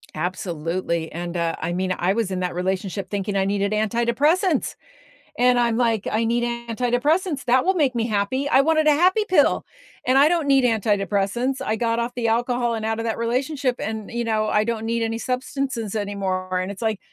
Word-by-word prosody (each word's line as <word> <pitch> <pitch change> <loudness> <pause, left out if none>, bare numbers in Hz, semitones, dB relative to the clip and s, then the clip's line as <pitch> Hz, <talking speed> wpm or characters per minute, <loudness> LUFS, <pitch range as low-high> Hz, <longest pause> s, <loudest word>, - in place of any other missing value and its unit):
Absolutely, 170 0 -3
and, 175 +1 -5
uh 170 -1 0
I 165 - -2
mean, 185 +1 -1
I 185 +2 +1
was 220 -3 -1
in 185 - -2
that 180 -1 -2
relationship 190 +2 -2
thinking 200 0 -3
I 195 -1 +2
needed 200 0 0
antidepressants, 235 - +1 0.6
and 250 0 +4
I'm, 235 -2 +2
like, 230 -4 +1
"I 220 +2 +1
need 235 +1 +1 0.3
antidepressants, 270 - 0
that 255 +1 +3
will 380 - +3
make 285 -8 +1
me 230 -1 0
happy." 220 +6 -1
I 270 - +5
wanted 315 +1 +2
a - - +7
happy 370 +8 +3
pill, 370 - +3 0.4
and 255 +1 +3
I 280 +2 +7
don't 335 -4 0
need 270 -1 +4
antidepressants, 215 +3 0
I 215 - 0
got 230 +1 0
off 235 +1 -2
the 240 -2 -1
alcohol 240 +1 +1
and 220 -1 -4
out 225 0 -1
of 230 - -3
that 225 - -1
relationship, 255 +3 -1
and, 220 +1 -5
you 235 0 -2
know, 215 -2 0
I 210 0 +2
don't 225 0 -3
need 230 +1 -1
any 225 0 -2
substances 250 -2 -3
anymore, 190 -3 -2
and 185 +1 -3
it's, 200 - -10
like 220 -3 -1
230 Hz, 200 wpm, -23 LUFS, 200-255 Hz, 0.6 s, a